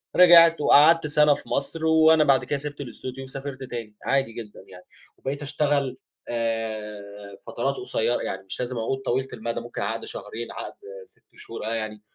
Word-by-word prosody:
رجعت 170 -2 +8
وقعدت 155 +2 +6
سَنة 150 0 +4
في - - -9
مصر 160 +3 -2
وأنا 160 -1 +5
بعد 135 -2 +3
كده 145 - -2
سِبت 145 0 -6
الاستوديو 130 +1 -7
وسافرت 135 0 -7
تاني، 115 -4 -7
عادي 135 -4 +1
جدًا 110 -3 -9
يعني. 90 -1 -14 0.3
وبقيت 140 +2 -4
أشتغل، 145 -2 0 0.3
آآ 105 -3 -4
فترات - - -2
قصيرة - - -1
يعني، - - -4
مش 95 - -8
لازم 125 0 -3
عقود 115 +4 -2
طويلة 130 +2 0
المدى، 115 +1 -4
ممكن 120 0 -7
عقد - - -3
شهرين، 115 +1 -7
عقد - - -7 0.3
6 - - -23
شهور، - - -8
آه، 115 - -2
يعني 110 -1 -5
130 Hz, 170 wpm, -25 LUFS, 115-145 Hz, 0.3 s, رجعت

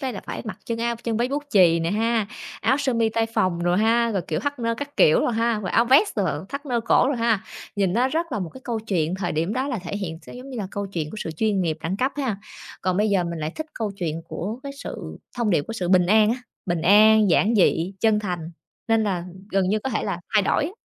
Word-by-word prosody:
đây 265 -3 -2
là 200 - -6
phải - - -5
mặc 215 - -6
chân 230 -1 -3
a 235 0 0
chân 230 -1 -3
váy 240 +2 +1
bút 285 +2 -2
chì 170 -4 +5
nè 165 +1 -1
ha, 225 +1 +1 0.3
áo 265 - +3
sơ 275 -3 0
mi 230 -1 +2
tay 225 +1 0
phồng 185 -6 0
đồ 175 0 +2
ha, 230 +4 +3
rồi, 195 -3 -1
kiểu, 155 0 -1
thắt 285 +5 -3
nơ 230 -1 0
các 285 +4 -7
kiểu 155 - +5
rồi - - +1
ha, 230 -1 +1
rồi 195 - -4
áo 230 - +4
vest, 275 - +4
ờ, 165 -7 -1
thắt 280 +2 -6
nơ 245 -3 0
cổ 230 +3 +3
rồi 280 - 0
ha, 230 -3 +2 0.4
nhìn 195 -3 +1
nó 245 +5 +2
rất 330 +4 -2
là - - -1
một 180 -4 -4
cái 260 - -10
câu 230 -3 -2
chuyện 180 -6 -1
thời 185 -2 -2
điểm 165 +6 -1
đó 260 +4 -1
là 250 -6 -2
thể 185 +2 -5
hiện 170 -5 -4
sẽ - - -11
giống 255 +2 -9
như 250 - -6
là 205 - -3
câu 200 0 -3
chuyện 165 -6 -4
của - - -8
sự 165 - -4
chuyên 200 +5 0
nghiệp, 160 -2 -1
đẳng 170 +4 -2
cấp 260 +5 0
ha. 260 -8 -1 0.5
Còn 185 -1 0
bây 210 +2 +2
giờ 190 -3 +2
mình 170 -1 -4
lại 155 0 -2
thích 315 - -5
câu 220 -3 -2
chuyện 165 -3 -3
của 215 +8 -4
cái 280 - -6
sự - - -7 0.2
thông 235 -3 +1
điệp 165 -6 +3
của - - -5
sự 185 -6 -3
bình 180 -1 +4
an 215 +2 +5
á, 235 - 0 0.3
bình 175 -3 -1
an, 215 +2 +6
giản 215 +6 +3
dị, 185 -3 +3
chân 220 -2 +3
thành, 175 -5 -4 0.4
nên 225 -1 +3
là 200 -3 0
ừm, 170 - -7 0.3
gần 190 -1 +2
như 210 +3 +2
có 265 +5 -4
thể 220 - -1
là 185 -4 -3
thay 210 - +5
đổi 195 - +1
á. 310 - -3
215 Hz, 280 wpm, -24 LUFS, 180-235 Hz, 0.5 s, an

